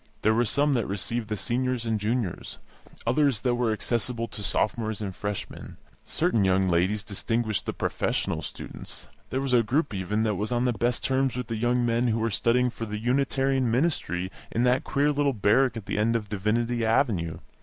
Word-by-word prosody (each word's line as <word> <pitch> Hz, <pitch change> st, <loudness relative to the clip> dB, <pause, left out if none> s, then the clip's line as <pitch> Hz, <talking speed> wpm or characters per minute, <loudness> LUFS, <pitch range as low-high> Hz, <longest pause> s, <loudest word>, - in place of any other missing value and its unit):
There 110 Hz, -, +4 dB
were 120 Hz, +2 st, +2 dB
some 145 Hz, +5 st, +2 dB
that 120 Hz, -4 st, 0 dB
received 105 Hz, +4 st, -3 dB
the 105 Hz, 0 st, -2 dB
Seniors 125 Hz, +1 st, -1 dB
and 110 Hz, -2 st, 0 dB
Juniors; 105 Hz, -3 st, -2 dB, 0.5 s
others 130 Hz, -1 st, +2 dB
that 125 Hz, -2 st, +1 dB
were 120 Hz, -2 st, +1 dB
accessible 115 Hz, +1 st, -1 dB
to 105 Hz, -, -7 dB
Sophomores 110 Hz, +2 st, 0 dB
and 100 Hz, -3 st, -4 dB
Freshmen. 105 Hz, -1 st, -5 dB, 0.3 s
Certain 115 Hz, -4 st, +1 dB
young 95 Hz, 0 st, +3 dB
ladies 95 Hz, +4 st, +1 dB
distinguished 110 Hz, +1 st, -1 dB
the -, -, -1 dB
professional -, -, -1 dB
students; -, -, -8 dB, 0.2 s
there 130 Hz, -, -1 dB
was 135 Hz, -2 st, -1 dB
a 120 Hz, -, +6 dB
group, 135 Hz, +5 st, 0 dB
even, 100 Hz, +3 st, -1 dB
that 110 Hz, -1 st, +1 dB
was 105 Hz, +4 st, -2 dB
on 120 Hz, +1 st, +1 dB
the 125 Hz, -, +2 dB
best 120 Hz, +2 st, 0 dB
terms 135 Hz, -1 st, +1 dB
with 125 Hz, -2 st, -4 dB
the 115 Hz, -, -1 dB
young 120 Hz, +2 st, +1 dB
men 120 Hz, +1 st, +2 dB
who 115 Hz, -1 st, +1 dB
were 115 Hz, 0 st, 0 dB
studying 125 Hz, +4 st, +2 dB
for 115 Hz, -, -6 dB
the 105 Hz, 0 st, -4 dB
Unitarian 135 Hz, +2 st, +1 dB
ministry 115 Hz, -, 0 dB, 0.2 s
in 115 Hz, -, 0 dB
that 125 Hz, +1 st, +3 dB
queer 145 Hz, +2 st, +1 dB
little 145 Hz, -1 st, +1 dB
barrack 115 Hz, +3 st, +3 dB
at 110 Hz, -, -7 dB
the -, -, -2 dB
end 115 Hz, +2 st, +2 dB
of 105 Hz, -3 st, -2 dB
Divinity 115 Hz, +4 st, 0 dB
Avenue. 110 Hz, -, +1 dB
115 Hz, 195 wpm, -27 LUFS, 105-125 Hz, 0.5 s, a